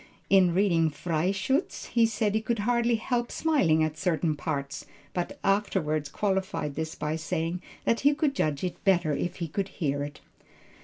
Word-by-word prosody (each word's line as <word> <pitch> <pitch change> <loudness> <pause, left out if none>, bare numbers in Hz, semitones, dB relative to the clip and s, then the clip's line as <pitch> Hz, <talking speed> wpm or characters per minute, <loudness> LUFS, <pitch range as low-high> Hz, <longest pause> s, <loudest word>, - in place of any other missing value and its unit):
In 185 -3 +5
reading 170 -5 +3
Freischutz, 185 - -1
he 230 -1 +4
said 215 -2 0
he 220 - +1
could 230 +1 -1
hardly 235 0 +2
help 240 +1 -1
smiling 190 - +2
at 155 -1 -2
certain 165 -3 +1
parts, 140 -2 -4 0.3
but 175 -1 -3
afterward 180 -7 0
qualified 190 -7 -1
this 160 +2 -4
by 150 +1 -2
saying 165 +2 -2 0.2
that 230 - +2
he 285 +1 +4
could 295 -2 +1
judge 150 - -1
it 180 - -4
better 175 -5 +3
if 175 +5 -2
he 170 - -4
could 195 +5 -2
hear 145 -7 -2
it. 145 0 -6
180 Hz, 165 wpm, -28 LUFS, 155-215 Hz, 0.3 s, In